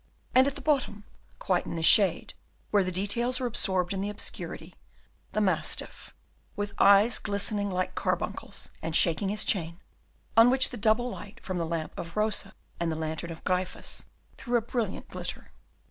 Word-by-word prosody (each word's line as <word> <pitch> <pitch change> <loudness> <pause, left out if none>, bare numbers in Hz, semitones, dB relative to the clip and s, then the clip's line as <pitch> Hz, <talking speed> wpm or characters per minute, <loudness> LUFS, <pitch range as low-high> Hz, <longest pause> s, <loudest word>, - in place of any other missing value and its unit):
And 260 +2 +6
at 280 - -2
the - - -8
bottom, 260 -9 0 0.3
quite 180 -2 0
in - - -4
the 165 - -3
shade, 185 0 +5 0.4
where 205 -2 +4
the 185 - -2
details 235 +7 0
are 255 - -2
absorbed 190 -5 0
in 190 - -2
the 200 - -2
obscurity, 210 - -5 0.6
the 215 - +1
mastiff, 195 -3 -2 0.4
with 205 0 -2
his - - -18
eyes 200 +4 +6
glistening 205 0 -1
like 185 -1 -2
carbuncles, - - -3
and 160 0 -3
shaking 175 +5 +2
his 210 +1 +2
chain, 170 -3 +1 0.6
on 230 +2 +8
which 260 +1 +5
the - - -5
double 235 +2 +1
light 205 -2 -10
from 185 -2 -3
the 165 - -2
lamp 160 -1 -3
of 170 +2 -7
Rosa 210 -2 0 0.2
and 170 -1 0
the - - -2
lantern 160 +1 -4
of 165 -1 -9
Gryphus 185 0 -2 0.3
threw 240 -1 +1
a - - 0
brilliant 230 -4 -3
glitter. - - -6
200 Hz, 175 wpm, -28 LUFS, 180-220 Hz, 0.6 s, on